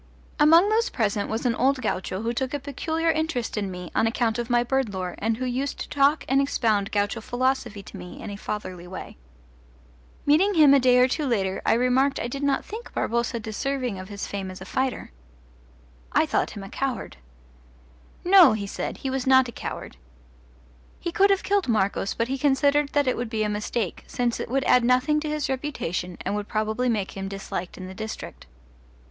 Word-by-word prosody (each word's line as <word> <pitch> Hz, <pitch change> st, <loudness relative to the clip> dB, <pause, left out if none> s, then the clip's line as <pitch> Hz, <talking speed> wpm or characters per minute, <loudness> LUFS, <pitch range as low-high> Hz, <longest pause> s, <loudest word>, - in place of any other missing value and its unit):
Among 325 Hz, +6 st, +7 dB
those 455 Hz, +2 st, +2 dB
present 205 Hz, -3 st, -1 dB
was 225 Hz, +3 st, -3 dB
an 240 Hz, -, +3 dB
old 265 Hz, +4 st, +2 dB
gaucho 190 Hz, -4 st, -2 dB
who 235 Hz, +1 st, -1 dB
took 260 Hz, +2 st, -2 dB
a -, -, -2 dB
peculiar 320 Hz, +4 st, -1 dB
interest 315 Hz, -7 st, -2 dB
in 205 Hz, -2 st, -2 dB
me 180 Hz, -2 st, -7 dB
on 225 Hz, -, +2 dB
account 230 Hz, 0 st, 0 dB
of 240 Hz, 0 st, -3 dB
my 240 Hz, -1 st, +3 dB
bird 265 Hz, -2 st, 0 dB
lore 185 Hz, -1 st, -3 dB
and 220 Hz, +1 st, 0 dB
who 255 Hz, -, -3 dB
used 260 Hz, +3 st, -2 dB
to -, -, -5 dB
talk 285 Hz, +2 st, +2 dB
and 270 Hz, +1 st, +3 dB
expound 220 Hz, -7 st, +1 dB
gaucho 205 Hz, +2 st, 0 dB
philosophy 245 Hz, -4 st, -1 dB
to -, -, -10 dB
me 180 Hz, -, -9 dB
in -, -, -6 dB
a -, -, -5 dB
fatherly 185 Hz, -4 st, -6 dB
way. 185 Hz, +1 st, -8 dB, 1.1 s
Meeting 370 Hz, +8 st, +4 dB
him 300 Hz, -4 st, +7 dB
a 280 Hz, -, +6 dB
day 250 Hz, -1 st, +4 dB
or 250 Hz, 0 st, +6 dB
two 290 Hz, +2 st, -1 dB
later 195 Hz, -6 st, 0 dB
I -, -, +5 dB
remarked 255 Hz, +4 st, +2 dB
I -, -, -2 dB
did 275 Hz, +3 st, -5 dB
not 280 Hz, -1 st, +1 dB
think 450 Hz, +3 st, -8 dB
Barboza 235 Hz, +1 st, 0 dB
deserving 240 Hz, 0 st, -3 dB
of 185 Hz, +1 st, -9 dB
his 200 Hz, -1 st, -5 dB
fame 195 Hz, -2 st, -5 dB
as 185 Hz, -, -8 dB
a -, -, -9 dB
fighter. 260 Hz, -, -2 dB, 1.0 s
I -, -, +3 dB
thought -, -, 0 dB
him 200 Hz, -, -6 dB
a 195 Hz, -, -9 dB
coward. 260 Hz, -, -3 dB, 1.1 s
No, 360 Hz, -, +8 dB
he 210 Hz, -2 st, -3 dB
said, 195 Hz, -, -4 dB
he 265 Hz, -, 0 dB
was 265 Hz, 0 st, -2 dB
not 260 Hz, -1 st, +6 dB
a -, -, -6 dB
coward. -, -, -7 dB, 1.0 s
He 345 Hz, -, -3 dB
could 395 Hz, +3 st, +4 dB
have 390 Hz, -1 st, +2 dB
killed 400 Hz, -4 st, +1 dB
Marcos, 200 Hz, -3 st, 0 dB
but 230 Hz, -, 0 dB
he 270 Hz, +1 st, -3 dB
considered 285 Hz, +1 st, +3 dB
that 290 Hz, -1 st, +3 dB
it 255 Hz, -, +2 dB
would 240 Hz, -1 st, -3 dB
be 220 Hz, -1 st, -1 dB
a 210 Hz, -, 0 dB
mistake, 210 Hz, -1 st, -3 dB
since 245 Hz, -2 st, -1 dB
it -, -, -4 dB
would 270 Hz, +2 st, +1 dB
add 250 Hz, -3 st, +4 dB
nothing 255 Hz, +5 st, +3 dB
to 305 Hz, 0 st, -4 dB
his 300 Hz, -1 st, -1 dB
reputation 255 Hz, -, -3 dB
and -, -, -2 dB
would 210 Hz, 0 st, -3 dB
probably 220 Hz, +3 st, 0 dB
make 210 Hz, -4 st, -1 dB
him 195 Hz, 0 st, -4 dB
disliked 195 Hz, -2 st, -5 dB
in 185 Hz, -, -7 dB
the 185 Hz, -, -8 dB
district. 220 Hz, +2 st, -7 dB
245 Hz, 205 wpm, -25 LUFS, 210-275 Hz, 1.1 s, No